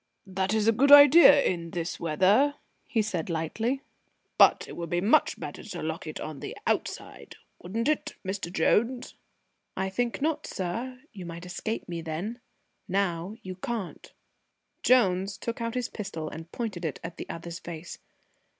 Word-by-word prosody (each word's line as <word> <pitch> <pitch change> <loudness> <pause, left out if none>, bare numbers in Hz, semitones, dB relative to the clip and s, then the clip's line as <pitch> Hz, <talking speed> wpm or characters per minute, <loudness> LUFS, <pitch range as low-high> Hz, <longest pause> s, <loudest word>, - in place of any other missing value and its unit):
"That 190 0 -2
is 215 0 +1
a - - +7
good 270 +6 +3
idea 290 0 +9
in 170 -2 -1
this 165 0 -4
weather," 190 - +3 0.3
he 225 -3 +1
said 180 -5 -3
lightly, 225 - -2 0.6
"but - - +6
it - - -9
would 170 -1 -5
be 175 - +1
much 220 +12 +3
better - - -7
to - - -7
lock - - -4
it - - -6
on - - -6
the - - -7
outside, - - -3 0.3
wouldn't 225 +7 -2
it, 305 0 0
Mr. 190 -2 -3
Jones?" 235 +8 +1 0.6
"I 190 0 -1
think 240 +4 -1
not, 305 +2 -1
sir. 235 +8 -4
You 185 -4 -8
might 170 +1 -8
escape 215 +5 -4
me 170 -1 -4
then. 170 +9 -4 0.5
Now 185 0 -1
you 185 - -5
can't." 195 0 -5 0.7
Jones 195 -5 +3
took 235 0 -4
his 235 +1 -2
pistol 165 -7 -5
out - - -11
and 165 +2 -9
pointed 210 -7 -4
it 160 -4 -3
at 165 0 -7
the - - -7
other's 170 0 -6
face. 170 0 -8
190 Hz, 165 wpm, -28 LUFS, 170-235 Hz, 0.7 s, idea